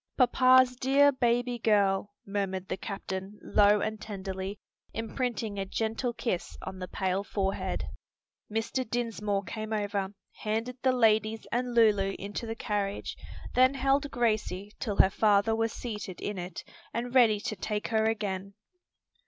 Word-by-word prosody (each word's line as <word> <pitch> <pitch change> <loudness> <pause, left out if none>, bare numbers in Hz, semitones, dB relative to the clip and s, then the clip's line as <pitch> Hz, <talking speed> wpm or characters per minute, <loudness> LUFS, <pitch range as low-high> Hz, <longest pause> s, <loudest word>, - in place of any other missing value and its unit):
"Papa's 255 0 +5
dear 275 +3 +5
baby 245 -1 +1
girl!" 205 -2 +2
murmured 195 -2 -2
the - - 0
captain 195 0 -5
low 205 0 +4
and 215 -1 -3
tenderly, 195 -1 -5 0.4
imprinting 225 -2 -2
a 195 - -1
gentle 225 +4 -1
kiss 230 -6 -3
on 190 0 -6
the 185 - -5
pale 190 +1 -1
forehead. 195 -1 -2 0.7
Mr. 225 +4 -1
Dinsmore 215 -4 -1
came 215 +4 -5
over, 205 -2 -1 0.2
handed 225 +4 -2
the 260 - +4
ladies 220 -2 +2
and 245 0 -1
Lulu 205 -4 +4
into 205 +4 -5
the 225 - -3
carriage, 205 -3 -2 0.4
then 255 +2 +5
held 275 +2 +2
Gracie 215 -5 -1
till 210 -5 -2
her 190 - +6
father 210 +1 +3
was 225 0 0
seated 210 -7 -6
in 205 -2 -3
it 175 -1 -6 0.3
and 240 +1 -3
ready 230 -5 +5
to 215 - -3
take 210 +2 -3
her 220 -1 +2
again. 200 -3 -2
215 Hz, 145 wpm, -29 LUFS, 200-240 Hz, 0.7 s, her